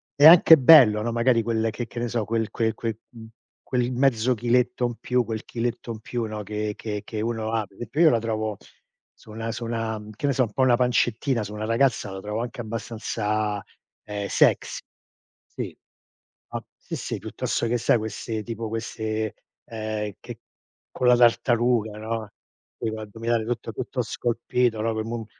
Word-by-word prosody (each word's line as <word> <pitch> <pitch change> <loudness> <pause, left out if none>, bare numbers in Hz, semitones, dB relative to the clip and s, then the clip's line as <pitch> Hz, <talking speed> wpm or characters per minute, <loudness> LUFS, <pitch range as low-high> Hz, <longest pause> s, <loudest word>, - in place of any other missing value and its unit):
è 145 - +5
anche 165 0 +10
bello, 130 -7 +8
no, 120 - -1
magari 115 0 +2
quel 115 0 0
che 120 +3 -4
che 120 - -7
ne 120 - -1
so, 115 -2 -1
quel 115 0 -1
quel 110 -1 0
quel 115 -2 -3
mhmm, 115 -2 -11 0.4
quel 125 -1 +1
mezzo 125 -1 +2
chiletto 125 +2 +1
in 120 - -5
più 125 0 +1
quel 110 -1 -5
chiletto 120 0 -3
in 110 - -6
più, 120 +1 -3
no, 110 -1 -5
che 105 +1 -3
che 105 -2 -4
che 110 -2 -4
uno 110 -1 -2
ha. 110 -2 0
Pe 95 - -24
e 120 - -5
pe 140 +8 -5
io 165 - +8
la 115 - +3
trovo 110 -2 -2 0.6
su - - -20
una 115 +1 -4
su 120 - -5
una 115 -1 -3
che 125 - -4
ne 140 - +2
so, 130 - +3
un 110 -3 -4
po' 130 - +2
una 125 -2 +5
pancettina, 125 0 +1
su 105 0 -7
una 105 0 -4
ragazza 115 -1 +1
la 95 - -6
trovo 105 +3 -3
anche 120 0 -5
abbastanza, 110 -2 -2 0.4
ehm, 105 -1 -3
sex. - - +2 0.7
Sì. - - -7 0.8
A - - -3
sì, - - -7
sì, - - -4
piuttosto 115 - -2
che 120 +2 +1
sai, 120 - +3
queste 110 +1 -4
tipo 115 0 -5
queste 110 -1 -3 0.3
ehm, 110 -2 -4
che - - -9 0.5
con 125 - -3
la 125 - +7
tartaruga, 120 -2 +3
no. 110 -1 -4 0.5
Poi 115 - -2
l'addominale 110 +1 -2
tutto 120 0 -3
tutto 125 +3 -3
scolpito, 120 0 0
no, 115 - 0
ehm, 110 0 -3
mu 120 +1 -3
mu 115 - -6
115 Hz, 190 wpm, -25 LUFS, 110-120 Hz, 0.8 s, anche